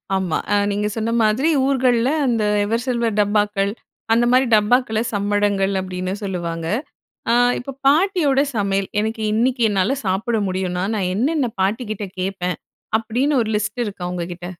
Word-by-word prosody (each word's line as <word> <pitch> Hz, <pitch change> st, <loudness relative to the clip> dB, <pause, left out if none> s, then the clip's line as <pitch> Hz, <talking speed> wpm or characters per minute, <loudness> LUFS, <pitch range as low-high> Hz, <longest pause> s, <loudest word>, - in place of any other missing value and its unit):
ஆமா. 185 Hz, -4 st, 0 dB, 0.2 s
ஆ -, -, +4 dB, 0.2 s
நீங்க 205 Hz, +1 st, -1 dB
சொன்ன 225 Hz, +1 st, -1 dB
மாதிரி 230 Hz, +9 st, +2 dB, 0.2 s
ஊர்கள்ல 255 Hz, -3 st, +2 dB, 0.2 s
அந்த 230 Hz, -3 st, +1 dB, 0.2 s
எவர்சில்வர் 230 Hz, 0 st, -1 dB
டப்பாக்கள், 205 Hz, -1 st, +1 dB, 0.4 s
அந்த 235 Hz, +1 st, +3 dB
மாதிரி 255 Hz, +1 st, +4 dB
டப்பாக்கள்ல 220 Hz, +1 st, +2 dB
சம்படங்கள் 205 Hz, -1 st, +1 dB
அப்பிடின்னு 185 Hz, 0 st, -4 dB
சொல்லுவாங்க. 170 Hz, -4 st, -3 dB, 0.7 s
ஆ -, -, +4 dB, 0.3 s
இப்போ 275 Hz, -, -7 dB, 0.2 s
பாட்டியோட 305 Hz, -3 st, +3 dB
சமையல் 195 Hz, -2 st, 0 dB
எனக்கு 220 Hz, +1 st, -3 dB
இன்னக்கி 245 Hz, +2 st, +1 dB
என்னால 205 Hz, +7 st, +1 dB
சாப்பிட 215 Hz, +5 st, 0 dB
முடியுன்னா, 185 Hz, -1 st, -2 dB
நான் 185 Hz, -3 st, -1 dB
என்னென்ன 265 Hz, +3 st, +1 dB
பாட்டிகிட்ட 210 Hz, +1 st, -2 dB
கேப்பேன்? 185 Hz, -1 st, -2 dB, 0.4 s
அப்பிடின்னு 250 Hz, +5 st, 0 dB
ஒரு 220 Hz, -, -2 dB
லிஸ்ட் 215 Hz, +3 st, -2 dB
இருக்கா 200 Hz, -4 st, -6 dB
உங்ககிட்ட? 175 Hz, 0 st, -5 dB
210 Hz, 135 wpm, -20 LUFS, 195-245 Hz, 0.7 s, ஆ